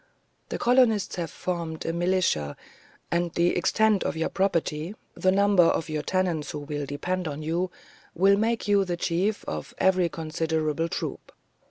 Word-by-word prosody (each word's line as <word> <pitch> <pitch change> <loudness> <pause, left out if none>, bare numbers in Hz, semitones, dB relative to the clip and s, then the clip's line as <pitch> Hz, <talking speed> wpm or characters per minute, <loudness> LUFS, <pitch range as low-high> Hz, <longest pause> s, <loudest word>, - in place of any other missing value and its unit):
The - - -2
colonists 240 -6 +3
have 170 -2 -2
formed 170 -3 -4
a 165 - -1
militia, 170 - 0 0.5
and 170 0 +1
the 170 +1 +2
extent 215 +3 +2
of - - -2
your 160 - 0
property, 170 -2 -1 0.2
the 185 - +2
number 200 -1 +4
of 165 -1 +2
your 155 -1 -1
tenants 175 -3 -1
who 150 - -4
will 145 -1 -4
depend 180 +6 -2
on 150 0 -5
you, 170 +4 -1 0.5
will 195 +3 +5
make 225 +1 0
you 200 -1 +4
the 175 -2 -3
chief 185 +5 0
of 75 -1 -5
a 190 - +5
very 180 -2 +1
considerable 160 0 -1
troop. - - -5
175 Hz, 165 wpm, -26 LUFS, 160-190 Hz, 0.5 s, will